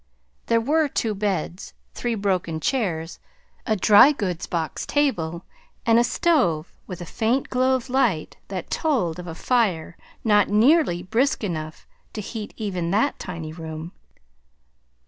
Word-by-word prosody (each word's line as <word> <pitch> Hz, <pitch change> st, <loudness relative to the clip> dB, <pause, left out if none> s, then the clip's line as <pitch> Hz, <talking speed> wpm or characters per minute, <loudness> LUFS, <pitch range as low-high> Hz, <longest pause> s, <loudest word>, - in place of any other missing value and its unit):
There 230 Hz, 0 st, +3 dB
were 300 Hz, +6 st, +2 dB
two 225 Hz, -5 st, -1 dB
beds, 195 Hz, -3 st, -3 dB, 0.2 s
three 240 Hz, -1 st, -2 dB
broken 185 Hz, -6 st, -1 dB
chairs, 175 Hz, -, -2 dB, 0.5 s
a 220 Hz, -, +2 dB
dry 210 Hz, +7 st, +7 dB
goods 185 Hz, -, -3 dB
box 165 Hz, -2 st, -3 dB
table, 170 Hz, -, 0 dB, 0.4 s
and 230 Hz, 0 st, +5 dB
a -, -, +4 dB
stove 240 Hz, -, +1 dB
with 180 Hz, -2 st, -7 dB
a -, -, -5 dB
faint 230 Hz, +9 st, -1 dB
glow 255 Hz, +1 st, +3 dB
of 255 Hz, 0 st, -4 dB
light 245 Hz, -, 0 dB
that 185 Hz, -3 st, -6 dB
told 230 Hz, -, 0 dB
of 180 Hz, -, -7 dB
a 165 Hz, -, -6 dB
fire 190 Hz, -9 st, 0 dB, 0.3 s
not 210 Hz, -3 st, +4 dB
nearly 215 Hz, -, +3 dB
brisk 240 Hz, +9 st, +1 dB
enough 155 Hz, -5 st, -4 dB, 0.3 s
to 215 Hz, -, -4 dB
heat 210 Hz, +1 st, -6 dB
even 185 Hz, -6 st, -2 dB
that 220 Hz, +10 st, +1 dB
tiny 165 Hz, -4 st, -6 dB
room. 160 Hz, 0 st, -7 dB
205 Hz, 145 wpm, -23 LUFS, 170-245 Hz, 0.5 s, dry